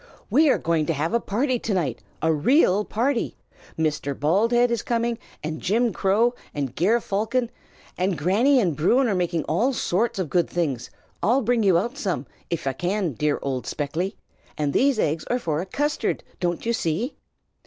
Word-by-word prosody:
"We 305 +1 +5
are - - +4
going 160 -2 0
to 165 - +1
have 155 +5 -2
a 235 - +3
party 245 +4 0
to 220 - -2
night, 175 -5 -1 0.2
a 160 0 +3
real 205 - +3
party! 240 +4 -1 0.4
Mr. 150 -3 -1
Baldhead 230 +10 +3
is 235 -3 0
coming, 235 0 -1 0.2
and 155 +1 -4
Jim 230 +3 +1
Crow, 220 +5 +2 0.2
and 135 -4 -3
Ger 215 +8 +3
Falcon. 230 +4 -1 0.5
And 185 -1 +1
Granny 220 - +3
and 175 -9 +1
Bruin 240 - +3
are 215 - +1
making 175 -3 0
all 235 - +1
sorts 225 0 0
of 185 -3 -1
good 175 +3 +1
things, 140 -9 -2 0.3
I'll 240 +8 +3
bring 240 +1 +2
you 190 -5 +4
out 240 +10 -2
some, 180 - -2 0.2
if 170 -3 -3
I 135 - 0
can, 180 +4 -1
dear 150 +5 0
old 130 -3 -3
Speckly, 160 - -2 0.4
and 145 -2 0
these 275 -1 +3
eggs 155 -5 0
are 245 - 0
for 160 -9 -1
a 185 - -6
custard, 290 +9 -1 0.2
don't 175 +2 -2
you 235 - +1
see?" 215 - -1
190 Hz, 185 wpm, -24 LUFS, 160-235 Hz, 0.5 s, We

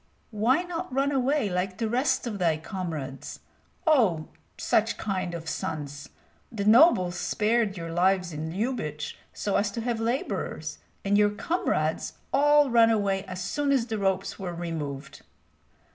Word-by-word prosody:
"Why 235 +10 +2
not 355 -1 -5
run 275 +2 +1
away 275 -2 +1
like 185 0 -2
the 225 - -1
rest 255 +4 +1
of 215 -4 -4
thy 165 -3 +2
comrades? 160 -6 -6 0.5
Oh, 220 - +3 0.3
such 220 +1 +1
kind 185 -4 -2
of 165 -1 -7
sons! 145 -2 -4 0.4
The 205 -4 -3
nobles 215 - +6
spared 210 +2 0
your 165 -1 -5
lives 180 0 +2
in 155 +1 -4
Lyubich 180 - -3 0.2
so 205 - -1
as 205 - +1
to 230 - -3
have 235 -1 -1
laborers, 235 +5 -3 0.3
and 205 +1 +3
your 205 0 +5
comrades 205 - -1 0.2
all 290 0 +5
ran 230 -1 +6
away 200 -3 +1
as 185 -1 -6
soon 280 +9 0
as 260 -4 +2
the 220 -3 -3
ropes 195 -1 -1
were 180 -3 -4
removed." 150 -5 -5
200 Hz, 150 wpm, -27 LUFS, 175-240 Hz, 0.5 s, nobles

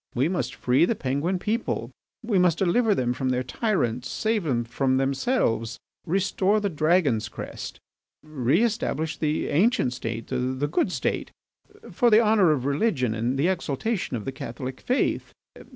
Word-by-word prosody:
We 130 +4 +2
must 165 -9 -2
free 130 +6 +3
the 230 - 0
Penguin 145 +5 -1
people, 220 +6 -2 0.3
we 215 -4 +1
must 180 -2 +3
deliver 205 +4 +2
them 125 -1 0
from 130 +1 -2
their 125 0 0
tyrants, 125 - -1
save 215 -4 -1
them 120 -5 0
from 130 +3 0
themselves, 135 - 0 0.3
restore 195 +3 +1
the 205 -1 -1
Dragon's 155 -7 +2
crest, - - -7 0.4
reestablish 155 - 0
the 155 0 -1
ancient 180 - +2
State, 115 -2 -5
the 130 +2 -1
good 150 - 0
State, - - -2 0.6
for 245 -3 +3
the 215 -1 +7
honour 215 -6 +4
of 135 -4 0
religion 140 - +1
and 120 +4 -1
the 145 +5 +2
exaltation 180 - -1
of 105 - -7
the 135 - -2
Catholic 130 0 -7
faith. 255 +2 0
150 Hz, 150 wpm, -25 LUFS, 130-195 Hz, 0.6 s, the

